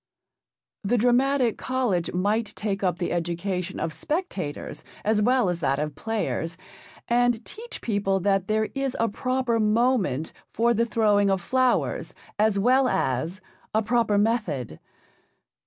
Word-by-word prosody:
The 225 +5 +1
Dramatic 250 +1 +2
College 245 -10 0
might 205 +5 0
take 200 -2 -3
up 180 -2 +1
the 175 - -2
education 175 +2 -2
of 160 - -2
spectators 295 - -4 0.2
as 215 0 +2
well 250 0 +3
as 175 -1 -1
that 140 -3 +1
of 150 0 -2
players, 170 -3 -3 0.5
and 240 -1 +2
teach 470 +3 -9
people 200 -3 0
that 195 0 +1
there 215 0 +1
is 275 -2 -2
a 230 - +3
proper 250 +1 0
moment 215 - +1 0.2
for 235 +1 +2
the 235 +1 +1
throwing 210 -3 +3
of 195 -1 +2
flowers 255 +7 0 0.2
as 215 -1 +3
well 255 +6 +4
as 160 - -1 0.3
a 220 - +3
proper 230 -2 +2
method. 200 - 0
215 Hz, 140 wpm, -25 LUFS, 185-240 Hz, 0.5 s, well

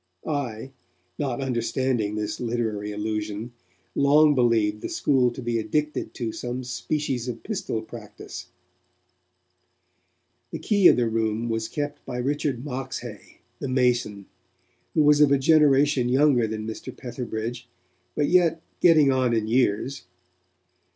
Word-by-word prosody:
I, 135 -5 -3 0.5
not 135 -3 -2
understanding 120 -3 -1
this 105 -1 -3
literary 115 -4 -2
allusion, 105 +2 -4 0.4
long 150 +2 +5
believed 115 -5 +2
the - - -4
school 130 -4 +2
to 120 +1 -8
be 120 -1 0
addicted 150 +6 -2
to 115 -3 -3
some 125 +2 -5
species 130 0 -3
of 115 -2 -5
pistol 190 - -3
practice. 110 -2 -10 2.0
The - - -5
key 200 -4 +4
of - - +7
the 120 -1 +1
Room 115 +1 -1
was 115 0 -1
kept 145 +2 -4
by 125 - -6
Richard 140 0 -2
Moxhay, 125 -5 -7 0.2
the - - -4
mason, 120 -6 +1 0.7
who 155 - +4
was 150 0 +5
of 145 -2 +6
a 140 - +5
generation 140 -3 +4
younger 130 -3 +3
than 110 0 -5
Mr. 110 0 -6
Petherbridge, 120 -1 -5 0.5
but 150 - +1
yet 170 -2 +3 0.2
'getting 155 -5 +6
on 130 -3 +2
in 110 -1 0
years'. 125 +2 +1
125 Hz, 130 wpm, -25 LUFS, 115-140 Hz, 2.0 s, of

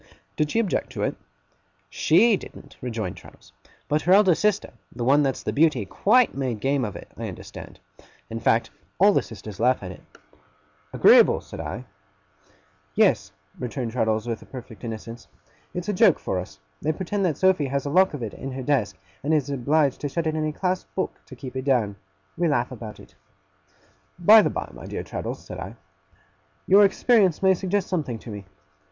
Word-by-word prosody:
'Did 150 -1 0
she - - -2
object 230 -5 0
to - - -4
it?' - - -1 0.8
'SHE 210 +8 +4
didn't,' 145 -6 -11
rejoined 115 -6 -4
Traddles; - - -16 0.4
'but 150 +1 +1
her 180 +4 +3
eldest 190 -4 +5
sister 210 -1 +1 0.2
the 120 - -5
one 140 +4 +4
that's 135 -2 -1
the - - -2
Beauty 145 -8 +3
quite 240 - +3
made 130 -5 -2
game 135 +3 0
of 105 -4 -4
it, - - -10
I - - -4
understand. - - -10 0.5
In 115 - -5
fact, 115 0 +1 0.3
all 200 +2 +6
the - - +3
sisters 105 -2 -10
laugh 125 -3 +2
at 90 - -6
it.' - - -12 0.9
'Agreeable!' - - +6
said - - -11
I. 125 +3 -5 1.1
'Yes,' - - +3 0.3
returned 125 -1 -4
Traddles 110 -2 0
with 115 -2 -6
perfect 125 -4 -10
innocence, 115 0 -7 0.4
'it's 180 0 -5
a - - +1
joke 180 - +5
for 95 - -2
us. 90 -4 -8 0.2
They 155 - +1
pretend 195 +4 -2
that 165 -5 0
Sophy 185 -6 +3
has 140 +1 -2
a 140 - -2
lock 185 0 +4
of 130 - -6
it 110 - -5
in 135 0 -7
her 130 0 -5
desk, 130 -6 0 0.3
and 155 +3 +2
is 145 -2 0
obliged 140 +1 +1
to 145 - -2
shut 165 +3 -2
it 155 - 0
in 155 0 -1
a - - -1
clasped 180 +3 -3
book, 190 - -1 0.2
to 130 - -11
keep 130 +1 -9
it 130 0 -4
down. 120 -7 +1 0.4
We 175 - +1
laugh 130 -5 0
about 110 -4 -8
it.' - - -16 1.0
'By 210 +6 +8
the - - +1
by, - - -4
my - - -10
dear - - -4
Traddles,' - - -6
said - - -8
I, - - -7 0.9
'your 200 +2 +7
experience 200 -3 +3
may 190 0 +6
suggest 190 +1 -1
something 150 -10 -2
to 110 - -10
me. 100 -1 -8
140 Hz, 190 wpm, -24 LUFS, 120-180 Hz, 1.1 s, By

